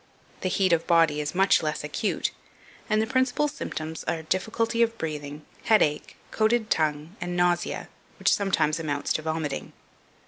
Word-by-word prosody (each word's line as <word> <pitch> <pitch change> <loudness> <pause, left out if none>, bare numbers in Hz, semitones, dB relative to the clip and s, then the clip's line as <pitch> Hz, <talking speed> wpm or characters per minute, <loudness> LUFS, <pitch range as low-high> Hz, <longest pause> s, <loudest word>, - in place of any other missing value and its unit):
The 185 - 0
heat 185 -1 +2
of 165 -1 +1
body 165 -3 +4
is 150 +4 -4
much 195 +1 +4
less 155 -2 -2
acute, 150 +8 -1 0.6
and 215 -1 +3
the 220 - +2
principal 260 +4 +1
symptoms 160 - -5
are 160 -1 -2
difficulty 225 +7 0
of 230 0 +2
breathing, 150 -3 -5 0.2
headache, 150 -9 +2 0.2
coated 220 0 +1
tongue, 155 +2 0
and 175 0 -3
nausea, 175 0 +1 0.3
which - - +3
sometimes 165 -6 +1
amounts 145 -3 -1
to - - -1
vomiting. 155 -2 -3
170 Hz, 150 wpm, -26 LUFS, 155-215 Hz, 0.6 s, body